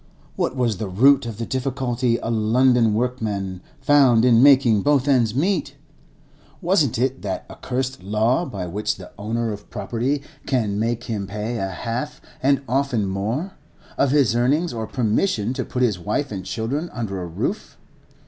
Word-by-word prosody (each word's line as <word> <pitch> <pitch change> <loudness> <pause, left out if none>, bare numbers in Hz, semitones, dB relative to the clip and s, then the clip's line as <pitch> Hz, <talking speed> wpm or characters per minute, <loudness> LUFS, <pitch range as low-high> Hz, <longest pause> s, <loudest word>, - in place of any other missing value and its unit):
What 130 - -1
was 120 -6 0
the 100 0 -4
root 130 +6 +4
of 110 -3 -6
the 115 - -3
difficulty 125 -2 -1
a 115 - -1
London 115 0 +3
workman 105 -6 -2 0.2
found 130 -5 +5
in 120 -2 +5
making 130 -6 +6
both 145 0 +2
ends 120 -5 +3
meet? 175 +3 0 0.8
Wasn't 165 - +2
it 130 +2 0
that 95 -2 -4
accursed 130 +1 -4
law 110 - +1
by 100 - -5
which 100 +5 -2
the 90 - -12
owner 115 +2 -2
of 105 0 -11
property 135 +5 -2 0.2
can 110 -6 0
make 115 +1 -1
him 105 -5 -4
pay 105 +4 -4
a 95 - -2
half, 115 +9 -4 0.2
and 140 +1 +2
often 130 -3 0
more, 110 - -2 0.4
of 140 - +2
his 135 -5 +3
earnings 145 +8 +2
for 110 -2 -4
permission 115 - 0
to - - -2
put 125 - -2
his 105 -7 +1
wife 135 +10 -2
and 95 -3 -5
children 135 - -3
under 100 -6 -4
a 90 - -5
roof? 85 - -4
120 Hz, 165 wpm, -22 LUFS, 105-135 Hz, 0.8 s, making